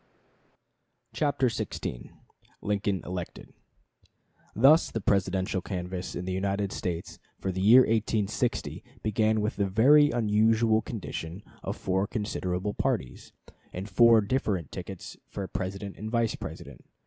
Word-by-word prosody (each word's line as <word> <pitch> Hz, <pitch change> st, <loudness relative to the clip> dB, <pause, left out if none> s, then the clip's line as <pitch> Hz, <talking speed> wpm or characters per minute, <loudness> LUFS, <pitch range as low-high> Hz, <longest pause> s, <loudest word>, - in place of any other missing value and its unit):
CHAPTER 145 Hz, -3 st, +1 dB
XVI 95 Hz, -, -3 dB, 0.5 s
LINCOLN 100 Hz, -2 st, -1 dB
ELECTED 90 Hz, -1 st, -6 dB, 1.0 s
Thus 140 Hz, -, +6 dB
the 115 Hz, -, -3 dB
Presidential 95 Hz, -2 st, 0 dB
canvass 90 Hz, -1 st, -5 dB
in 90 Hz, -, -4 dB
the 95 Hz, -, -3 dB
United 100 Hz, +1 st, -1 dB
States 85 Hz, -4 st, -4 dB, 0.2 s
for 95 Hz, -, -2 dB
the 95 Hz, +1 st, -3 dB
year 115 Hz, +6 st, +8 dB
1860 110 Hz, 0 st, 0 dB, 0.2 s
began 110 Hz, 0 st, +2 dB
with 105 Hz, -, -2 dB
the 100 Hz, -1 st, +1 dB
very 140 Hz, +9 st, +6 dB
unusual 110 Hz, 0 st, +3 dB
condition 95 Hz, -4 st, -6 dB, 0.2 s
of -, -, -4 dB
four 95 Hz, +2 st, 0 dB
considerable 105 Hz, -3 st, -2 dB
parties, 65 Hz, -10 st, -2 dB, 0.4 s
and 95 Hz, +3 st, -6 dB
four 115 Hz, +3 st, +6 dB
different 100 Hz, -, -1 dB
tickets -, -, -8 dB
for 100 Hz, -2 st, -5 dB
President 95 Hz, +2 st, -5 dB
and 110 Hz, +2 st, -5 dB
Vice 115 Hz, -1 st, +1 dB
President. -, -, -9 dB
100 Hz, 125 wpm, -28 LUFS, 95-110 Hz, 1.0 s, year